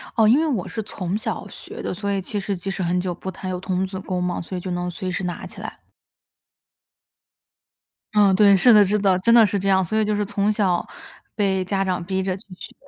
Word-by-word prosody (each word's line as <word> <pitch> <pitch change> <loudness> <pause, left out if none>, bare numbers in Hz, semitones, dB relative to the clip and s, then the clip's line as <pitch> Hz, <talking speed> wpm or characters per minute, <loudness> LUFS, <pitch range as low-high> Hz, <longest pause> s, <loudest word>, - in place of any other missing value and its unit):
哦， 220 -2 +4
因 255 +7 +5
为 325 - +1
我 230 - -1
是 220 - -4
从 190 -1 -3
小 - - -4
学 - - -9
的， - - -3
所 200 +2 -3
以 195 -1 -1
其 205 +2 -4
实 195 0 -2
即 180 +2 -6
使 190 - -4
很 180 +1 0
久 180 -1 -2
不 190 - -7
弹 185 0 -6
有 180 - -3
童 185 0 -1
子 190 0 -6
功 185 -1 -3
嘛， 180 0 -2
所 185 +2 -6
以 180 - -5
就 185 - -5
能 175 0 -2
随 185 +1 -5
时 190 - -3
拿 175 -1 -4
起 - - -10
来。 - - -8 2.3
嗯， 205 -2 +5
对， 200 0 +6
是 240 +6 +6
的 210 -2 +8
是 205 +2 +1
的， 195 -3 +3
真 230 +5 +3
的 230 -2 +8
是 200 0 -1
这 195 - -3
样， 190 -1 +4
所 215 +6 -2
以 215 - +2
就 210 0 0
是 210 - -1
从 200 +1 0
小 190 -4 +1 0.5
被 190 -3 0
家 195 +1 0
长 185 -2 -2
逼 190 +2 -2
着 185 -1 -1
去 - - -12
学。 - - -10
190 Hz, 265 characters per minute, -22 LUFS, 185-205 Hz, 2.3 s, 的